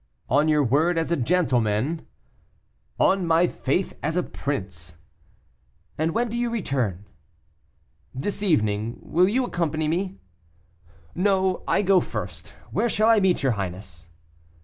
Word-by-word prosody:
"On 145 +5 +3
your 150 -1 +3
word 155 +7 +2
as 165 +1 -1
a - - +4
gentleman?" 130 -2 0 0.9
"On 190 -1 +3
my 165 +1 +4
faith 175 +2 -1
as 160 +3 -1
a 180 - +2
prince." 90 - -5 1.0
"And 160 +2 0
when 240 +1 +1
do 235 +1 -3
you 240 0 0
return?" 130 - -2 1.1
"This 195 +11 -3
evening; 110 - +1
will 180 +3 +3
you 255 +5 +1
accompany 160 -6 -1
me?" 185 +4 -1 1.0
"No, 190 -1 +1
I 205 - +2
go 190 -1 +5
first; - - -6 0.2
where 240 - +1
shall 215 +1 +3
I 225 -2 +6
meet 190 -5 +2
your 135 - +3
highness?" 90 -4 -5
160 Hz, 135 wpm, -24 LUFS, 120-190 Hz, 1.1 s, I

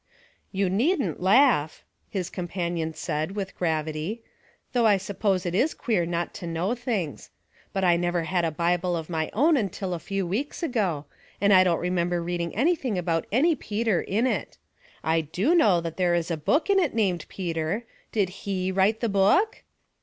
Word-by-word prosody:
" - - -40
You 200 - +3
needn't 260 - 0
laugh," 195 - +3 0.3
his 185 -4 -3
companion 170 -3 -3
said, 155 +2 -3
with 195 -2 -4
gravity. 160 +5 -2 0.2
'' - - -36
Though 240 -3 +4
I 205 -2 +5
suppose 195 -1 -1
it 175 - -2
is 265 - +1
queer 190 -8 0
not 170 0 -2
to 175 - -6
know 170 +6 -1
things. 225 - -3 0.4
But 195 - -1
I 175 -2 +4
never 175 -1 0
had 175 +1 0
a 165 - +2
Bible 175 +2 0
of 160 +1 -6
my 160 -1 -1
own 305 +8 +4
until 195 -4 -2
a 170 - -3
few 195 +3 -3
weeks 245 - -3
ago, 200 - -1 0.3
and 200 +1 +4
I 185 -1 +8
don't 175 -2 +2
remember 175 -1 0
reading 170 -1 -3
anything 265 - +1
about 170 -2 -1
any 295 +10 +4
Peter 220 - -1
in 220 +6 0
it. 215 - -2 0.5
I 160 +1 +2
do 185 - 0
know 210 - +5
that 165 -1 -5
there 175 -2 +2
is 170 0 -1
a - - +1
book 270 - +1
in 400 -1 +4
it 325 -10 0
named 185 -7 0
Peter; 170 +3 -2 0.3
did 200 -4 +1
he 190 0 -3
write 195 +4 +2
the 235 - +1
book 205 - +3
185 Hz, 185 wpm, -26 LUFS, 170-220 Hz, 0.5 s, I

